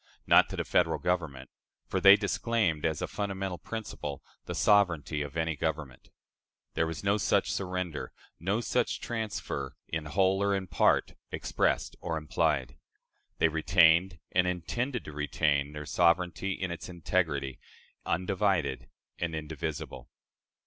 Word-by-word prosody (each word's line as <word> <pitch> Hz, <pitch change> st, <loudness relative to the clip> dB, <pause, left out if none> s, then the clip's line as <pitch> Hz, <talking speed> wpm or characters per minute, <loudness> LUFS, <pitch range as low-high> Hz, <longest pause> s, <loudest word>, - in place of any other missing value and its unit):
Not -, -, +6 dB
to -, -, -5 dB
the -, -, -1 dB
Federal -, -, +2 dB
Government; 80 Hz, -8 st, -2 dB, 0.3 s
for -, -, -2 dB
they 100 Hz, 0 st, +10 dB
disclaimed, 105 Hz, -9 st, 0 dB
as 80 Hz, -2 st, -2 dB
a -, -, -1 dB
fundamental 95 Hz, -3 st, -3 dB
principle, 100 Hz, -11 st, -6 dB, 0.2 s
the -, -, -5 dB
sovereignty 85 Hz, -7 st, +3 dB
of 75 Hz, +2 st, -5 dB
any 80 Hz, -1 st, 0 dB
government. 75 Hz, -3 st, -4 dB, 0.6 s
There 80 Hz, -, +1 dB
was 80 Hz, +1 st, -5 dB
no 100 Hz, +1 st, +3 dB
such 100 Hz, -, +2 dB
surrender, 90 Hz, -5 st, -3 dB, 0.3 s
no 100 Hz, +7 st, 0 dB
such 125 Hz, 0 st, 0 dB
transfer, 105 Hz, -, -4 dB
in 80 Hz, -1 st, -3 dB
whole 95 Hz, +4 st, +2 dB
or 100 Hz, 0 st, +2 dB
in 95 Hz, -1 st, -2 dB
part, 90 Hz, -, +2 dB, 0.2 s
expressed -, -, 0 dB
or 80 Hz, -2 st, -2 dB
implied. 75 Hz, -3 st, 0 dB, 0.6 s
They -, -, +4 dB
retained, 85 Hz, +2 st, +4 dB
and 90 Hz, 0 st, +3 dB
intended 120 Hz, +8 st, -2 dB
to -, -, -7 dB
retain, 75 Hz, -1 st, 0 dB
their 75 Hz, 0 st, -6 dB
sovereignty 90 Hz, +4 st, +2 dB
in 95 Hz, -1 st, -3 dB
its 85 Hz, -, -6 dB
integrity 80 Hz, -6 st, -1 dB, 0.4 s
undivided 90 Hz, -9 st, 0 dB, 0.3 s
and 85 Hz, -2 st, -2 dB
indivisible. 80 Hz, -1 st, -5 dB
85 Hz, 135 wpm, -30 LUFS, 75-95 Hz, 0.6 s, they